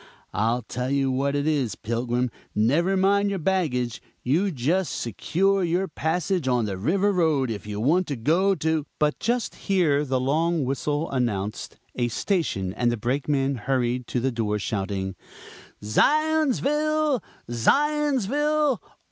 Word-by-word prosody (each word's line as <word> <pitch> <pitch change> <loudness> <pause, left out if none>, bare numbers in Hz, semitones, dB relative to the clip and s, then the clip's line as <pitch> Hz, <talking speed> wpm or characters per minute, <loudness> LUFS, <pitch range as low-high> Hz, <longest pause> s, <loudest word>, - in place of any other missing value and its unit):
I 115 +5 +1
tell 125 +1 -3
you 135 -1 +1
what 140 +2 0
it 145 0 0
is, 140 -9 0
Pilgrim, 120 +2 -1 0.2
never 160 - +2
mind 200 +2 +3
your 200 - -1
baggage, 150 - -1 0.2
you 165 +11 +2
just 160 +2 0
secure 190 - 0
your 180 +3 0
passage 165 0 -1
on 125 -3 +2
the 100 -2 -3
River 185 - +1
Road 155 -9 +1
if 105 -1 -6
you 105 -1 -4
want 165 +10 +2
to 145 - -2
go 170 - +2
to 160 -2 -1
" - - -47
But 150 -1 +1
just 240 -1 -1
here 165 -8 +1
the 130 -3 0
long 155 +3 +1
whistle 145 +4 -1
announced 110 -6 -2 0.2
a 120 -1 0
station, 115 - -1
and 120 +2 +1
the 120 - -2
Brakeman 135 +4 0
hurried 125 0 -1
to 125 - -1
the 130 +2 0
door, 110 -3 -1
shouting 95 -2 -3 0.7
"Zions 305 - +2
VILLE! 300 -2 +1 0.3
ZIONS 285 - +2
ville! 295 +2 +1
145 Hz, 150 wpm, -25 LUFS, 120-190 Hz, 0.7 s, mind